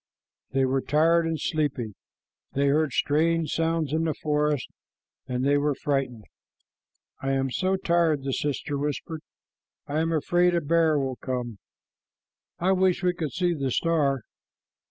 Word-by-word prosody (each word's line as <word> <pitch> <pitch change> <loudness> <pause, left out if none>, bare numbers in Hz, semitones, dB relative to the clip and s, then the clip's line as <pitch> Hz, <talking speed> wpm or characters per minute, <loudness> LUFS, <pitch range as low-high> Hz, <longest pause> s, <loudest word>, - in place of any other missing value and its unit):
They 135 0 +1
were 130 +1 +1
tired 165 +4 +3
and 160 -1 -2
sleepy. 145 -9 -1 0.6
They 140 +1 +2
heard 150 0 +2
strange 160 +5 +1
sounds 165 -3 0
in 160 +1 +1
the 155 - -1
forest, 150 -3 0 0.6
and 125 +1 -1
they 145 +1 +3
were 145 -1 +1
frightened. 130 -7 -2 1.0
"I 135 0 0
am 135 -1 0
so 190 +7 +1
tired," 170 -5 +1
the 135 -1 -2
sister 145 0 -2
whispered. 150 +2 -3 0.6
"I 145 +2 -2
am 165 +1 0
afraid 175 +3 +2
a 170 - +1
bear 160 0 +3
will 135 -2 -2
come. 125 -5 -4 1.0
I 185 +3 +1
wish 190 0 +2
we 180 -1 +3
could 160 -5 -4
see 180 -1 +1
the 140 -4 -2
star." 140 -2 +1
150 Hz, 150 wpm, -26 LUFS, 135-165 Hz, 1.0 s, tired